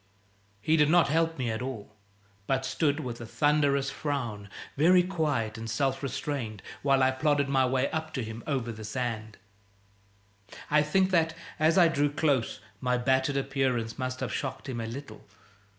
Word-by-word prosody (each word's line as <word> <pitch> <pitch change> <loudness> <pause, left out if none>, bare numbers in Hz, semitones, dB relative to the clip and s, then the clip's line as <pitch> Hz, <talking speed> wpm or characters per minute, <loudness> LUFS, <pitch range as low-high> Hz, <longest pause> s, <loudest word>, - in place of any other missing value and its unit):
He 155 +8 +2
did 150 -1 +4
not 170 -2 +5
help 165 +1 +1
me 125 -4 -1
at 110 - -3
all, 115 -5 -6 0.5
but 135 -1 0
stood 145 +2 0
with 120 -3 -6
a - - -6
thunderous 145 -1 +2
frown, 120 -9 -3 0.3
very 180 +5 +5
quiet 145 - -1
and 115 0 -6
self 135 +2 0
restrained, 130 -6 -4 0.2
while 135 -1 +3
I 130 - +4
plodded 145 +1 +1
my 135 -1 +3
way 130 +1 +1
up 160 0 -3
to 130 - -1
him, 110 +1 -7
over 130 -5 -1
the 110 -1 -9
sand. 110 -2 -4 1.3
I 150 0 +5
think 185 +6 +2
that, 165 -2 +2 0.2
as 160 +3 +3
I 175 -2 +7
drew 145 -2 +1
close, 145 -5 0 0.2
my 125 -1 +1
battered 130 +2 +1
appearance 130 -4 -1
must 130 0 -3
have - - -2
shocked 135 +1 -4
him 120 -3 -3
a 115 - -4
little. 115 -2 -8
135 Hz, 170 wpm, -28 LUFS, 120-150 Hz, 1.3 s, I